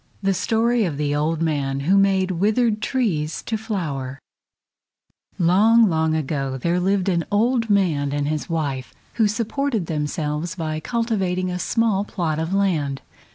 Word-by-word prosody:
THE 195 0 +2
STORY 230 +4 +1
OF 155 -6 -3
THE 145 -1 0
OLD 155 +2 0
MAN 140 -4 -1
WHO 175 +8 +2
MADE 195 -1 +3
WITHERED 215 +4 +1
TREES 170 - -1
TO 225 - -2
FLOWER 160 - -4 1.2
Long, 215 +7 +5
long 160 0 +1
ago 135 -3 -2
there 170 +7 0
lived 190 +1 +1
an 170 -3 +1
old 230 +2 +2
man 165 -9 +2
and 145 0 -1
his 155 +2 -3
wife 140 -6 -3 0.3
who 215 - +5
supported 230 0 -1
themselves 150 +2 -2
by 155 -3 -3
cultivating 190 -4 -1
a 180 - -3
small 220 -1 +1
plot 165 -7 -2
of 160 +2 -2
land. 165 -9 0
180 Hz, 150 wpm, -22 LUFS, 150-210 Hz, 1.2 s, Long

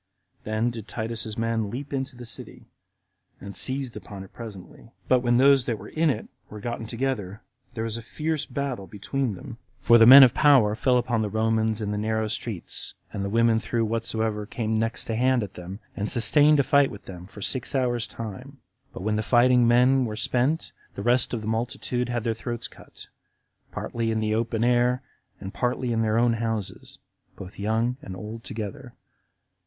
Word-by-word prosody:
Then 110 +3 0
did 115 -2 -8
Titus's 110 -1 -3
men 115 -2 -1
leap 135 +6 -6
into 135 0 -3
the 120 0 -10
city, 115 - -3 0.7
and 100 0 -9
seized 130 -3 +1
upon 100 -2 -8
it 95 - -15
presently; 110 -1 -10 0.2
but 130 - +4
when 120 -1 +2
those 135 -1 +5
that 115 - -1
were 100 +1 -11
in 160 0 +1
it 115 -6 -2 0.2
were 105 - -9
gotten 120 +1 -5
together, 115 -4 -3 0.3
there 110 - -2
was 115 0 -3
a - - -6
fierce 155 +6 -3
battle 135 -9 -4
between 110 +3 -3
them; 115 +5 -10 0.2
for 120 0 +5
the 115 - +8
men 135 +2 +12
of 125 - +6
power 135 -8 +5
fell 125 +3 +2
upon 120 -2 0
the 105 - -1
Romans 110 0 0
in 105 -1 -2
the 105 - -2
narrow 110 0 -1
streets, 110 -3 -4 0.2
and 100 - -3
the 100 - -2
women 115 +1 +3
threw 115 0 -1
whatsoever 110 -1 -2
came 110 -2 -2
next 115 +1 -1
to 115 - -2
hand 125 0 +2
at 100 - -7
them, 90 +3 -8 0.2
and 105 +1 -3
sustained 145 +6 +5
a - - +4
fight 140 +1 +4
with 105 - -11
them 90 -1 -10
for 105 0 -9
six 130 +1 -2
hours' 120 -3 0
time; 125 +5 -8 0.4
but - - -7
when 105 +1 0
the - - 0
fighting 120 +2 +4
men 125 +2 +4
were 110 -2 -4
spent, 130 +8 0 0.2
the 100 - -5
rest 120 +2 +3
of 120 - -3
the 105 - -6
multitude 120 +2 -2
had 120 -2 -2
their 115 - 0
throats 120 +1 -5
cut, - - -14 0.7
partly 115 -1 -3
in 110 0 0
the 110 0 0
open 115 0 -1
air, 125 +1 +2 0.4
and 95 0 -7
partly 125 0 -1
in 115 - +1
their 110 0 +1
own 120 0 +3
houses, 115 -3 -4 0.4
both 95 +1 -10
young 110 +4 0
and 95 - -8
old 110 +4 -8
together. 120 +4 -7
115 Hz, 195 wpm, -25 LUFS, 110-125 Hz, 0.7 s, men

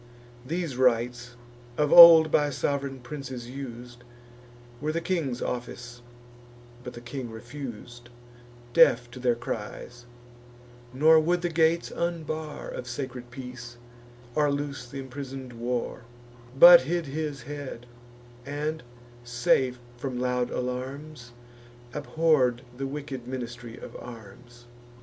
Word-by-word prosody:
These 160 -1 -3
rites, 120 -1 +1 0.4
of 150 -1 +2
old 165 -2 +11
by 145 -1 +3
sov'reign 140 -1 -2
princes 130 -3 -7
us'd, 120 -2 -9 0.8
Were 155 +1 -1
the 165 - -1
king's 165 -8 -2
office; 120 0 -6 0.8
but 125 - -7
the 120 - -10
king 120 0 -6
refus'd, 120 0 -9 0.6
Deaf 120 0 +5
to 125 - -10
their 125 -1 +2
cries, 120 +1 -7 0.8
nor 155 +5 +6
would 175 +3 0
the 175 - +1
gates 165 +1 +2
unbar 160 -3 -4
Of 125 - -7
sacred 125 -1 -6
peace, 125 -1 -9 0.6
or 150 0 +2
loose 140 -3 -4
th' 140 - -12
imprison'd 135 -1 -7
war; 120 +1 -3 0.6
But 175 +4 +10
hid 170 +5 -2
his 145 -2 -4
head, 140 -3 -7 0.6
and, 150 +4 -3 0.4
safe 125 +1 +1 0.2
from 125 0 -4
loud 125 -1 0
alarms, 130 +1 -5 0.6
Abhorr'd 145 -5 +1
the 135 +2 -4
wicked 135 -3 -6
ministry 120 -2 -7
of - - -10
arms. 120 +1 -12
130 Hz, 115 wpm, -27 LUFS, 120-150 Hz, 0.8 s, old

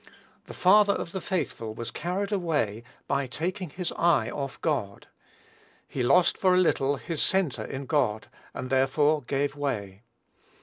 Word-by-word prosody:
The - - -10
father 200 +2 +5
of 170 - -4
the 190 - -4
faithful 130 - -3
was 115 +1 -5
carried 190 +5 -3
away, 150 - -1 0.2
by 140 -1 0
taking 180 - -3
his 180 +3 -4
eye 165 -9 +2
off 135 -2 -5
God. 115 -11 -2 0.8
He 135 - -4
lost 170 +8 +4
for 185 -1 +4
a - - +4
little 145 -6 +2
his 160 +3 -4
centre 165 - +1
in 135 +1 -6
God, 125 -8 0 0.2
and, 130 0 -6
therefore, 145 +3 +3
gave 140 +3 -1
way. 105 -9 -3
145 Hz, 150 wpm, -27 LUFS, 125-180 Hz, 0.8 s, father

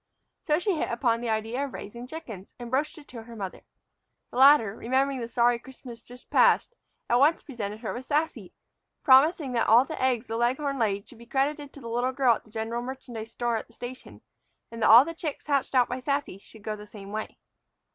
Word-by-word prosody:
So 300 -1 +1
she 380 +3 0
hit - - -1
upon 235 -1 0
the 240 - -3
idea 225 +5 -1
of 280 - -5
raising 235 +4 -8
chickens, 230 - -9
and 240 -1 -8
broached 300 +5 0
it 295 - -14
to 235 -2 -8
her 230 +1 -12
mother. 195 -4 -6 0.7
The - - -7
latter, 260 -6 +6
remembering 265 +3 0
the 230 - -4
sorry 240 0 +2
Christmas 245 -2 -11
just 245 +1 -15
past, - - +4 0.3
at 240 - +3
once 300 +5 +3
presented 215 -5 -6
her 225 - -4
with 250 +2 -7
Sassy, 305 +3 -1 0.5
promising 285 +2 +5
that 235 -2 +1
all 235 +4 +6
the - - -6
eggs 255 -2 +1
the 225 0 -4
leghorn 265 +4 0
laid 200 -3 0
should 240 - -15
be 235 - -14
credited 285 +2 -1
to 285 - -12
the 235 - -8
little 245 +3 -1
girl 260 -3 +4
at - - -6
the - - -19
general 225 +2 -3
merchandise 245 -3 -7
store 235 0 -1
at - - -7
the 230 - -22
station, 250 +2 -9 0.5
and 230 0 -8
that - - +4
all 235 +5 +9
the 330 - -5
chicks 315 -3 -5
hatched 280 -2 0
out 250 -1 +5
by 250 - -4
Sassy 280 -7 -2
should 215 +1 -16
go 215 0 -3
the 210 0 -11
same 200 -2 -11
way. 215 +1 -5
245 Hz, 220 wpm, -27 LUFS, 225-275 Hz, 0.7 s, all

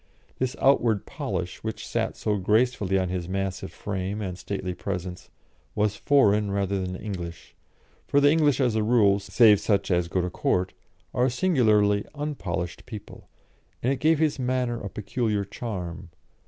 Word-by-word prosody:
This 130 +1 -1
outward 115 -6 +3
polish, - - -4
which - - -4
sat - - -2
so 105 -1 0
gracefully 105 -1 +2
on 95 -1 0
his 90 -1 -3
massive 95 -1 -3
frame 95 +1 -4
and 95 -4 -4
stately 95 -1 -4
presence, 90 -1 -5 0.5
was 105 0 +1
foreign 105 -4 +3
rather 100 -1 -1
than 90 0 -4
English 90 -5 -7 0.5
for 140 - +3
the 145 0 +5
English, 150 -4 +3
as 125 -4 +2
a 110 - +1
rule, 105 -3 +4
save 105 +1 +5
such 100 -2 0
as 90 -1 +2
go 90 - -1
to 90 0 -1
Court, 90 +1 0 0.4
are 125 - +2
a - - +3
singularly 110 - +3
unpolished 100 - -4
people 110 -5 -10 0.5
and 130 +3 +2
it 135 - -5
gave 160 +1 +4
his 155 -2 +1
manner 125 -2 -1
a 100 - -5
peculiar 105 +1 -2
charm. 95 -5 -6
105 Hz, 160 wpm, -26 LUFS, 95-125 Hz, 0.5 s, the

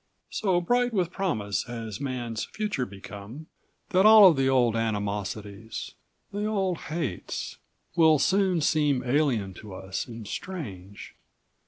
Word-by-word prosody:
"... - - -51
so 190 -4 +3
bright 245 +7 +1
with 180 -4 0
promise 110 - -1
has 115 -2 -6
Man's 120 -4 -3
future 210 - -3
become 100 +8 -10 0.4
that 185 +1 +4
all 215 -1 +10
of - - -1
the 135 -1 +2
old 120 -4 +3
animosities, 105 -1 -3 0.4
the 205 +1 -3
old 190 -5 0
hates, 150 - -4 0.4
will 160 -2 +6
soon 190 +2 +2
seem 145 -4 +2
alien 125 -7 +1
to 100 +1 -10
us 95 +5 -5
and 115 -3 -8
strange. 100 - -7
130 Hz, 135 wpm, -27 LUFS, -, 0.4 s, all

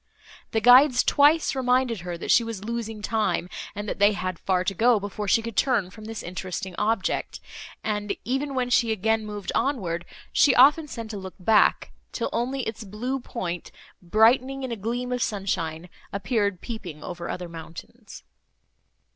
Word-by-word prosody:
The 220 - 0
guides 250 +2 +7
twice 300 +3 +4
reminded 250 -3 +1
her, 175 -1 -5
that - - -2
she 235 - +6
was 225 -4 -6
losing 225 -1 -4
time 210 -6 0 0.3
and 205 +1 -5
that - - -4
they 205 +1 +5
had 185 -3 -4
far 185 -1 +1
to 195 - -1
go, 230 +3 +4
before 205 +1 -5
she 225 +3 +3
could 230 -2 -6
turn 220 -9 +1
from 215 +2 -12
this 225 0 -6
interesting 185 +1 -5
object, 220 -2 -1 0.4
and, 210 -1 -2
even 270 +3 -2
when 250 -1 -1
she 235 -2 +3
again 220 +1 0
moved 205 -2 -5
onward, 185 -10 -1 0.3
she 280 - +5
often 295 +5 +6
sent 230 -5 -7
a - - -4
look 190 -1 -8
back, 210 +3 +3 0.2
till - - -2
only 260 +3 -1
its 220 0 -5
blue 235 +7 -3
point, 180 -9 -5 0.3
brightening 250 +8 +3
in 260 - -4
a - - -1
gleam 240 +4 -3
of 250 0 -1
sunshine, 180 -6 -2 0.2
appeared 200 -1 -1
peeping 180 -10 -7
over 175 -1 -6
other 180 -1 -4
mountains. 165 0 -11
220 Hz, 170 wpm, -25 LUFS, 190-245 Hz, 0.4 s, guides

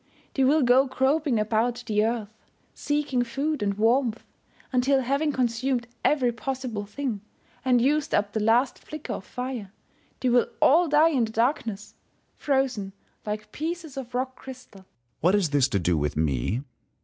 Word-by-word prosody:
They 270 - +1
will 290 +3 +4
go 255 +3 +5
groping 265 -1 +1
about 230 +3 0
the 210 -2 0
^ 225 +2 +1
earth, 205 +1 -18 0.4
seeking 290 -4 -1
food 275 +4 -2
and 200 -1 0
warmth, 230 +2 +1 0.5
until 265 +2 +3
having 280 +4 0
consumed 250 -1 0 0.2
every 260 -5 +3
possible 235 -3 -4
thing, 240 -3 -4 0.4
and 255 -2 +3
used 285 +4 +1
up 205 0 0
the 220 - 0
last 230 +5 +2
flicker 305 -1 -7
of - - -6
fire, 250 -6 -5 0.5
they 255 - +1
will 245 0 +4
all 335 +5 +5
die 305 +2 +5
in 260 -7 +2
the 220 - -7
darkness, 225 -3 -1 0.4
frozen 260 -8 -1 0.3
like 210 0 -4
pieces 320 -1 -5
of 255 -2 -7
rock 260 +1 -2
crystal. 255 -6 -11
Sun. - - -23 0.3
What 180 +5 +3
is 185 -7 +1
this 140 -3 +3
to 100 - 0
do 90 -2 +1
with 75 -1 -1
me 80 - 0
245 Hz, 165 wpm, -26 LUFS, 210-270 Hz, 0.5 s, go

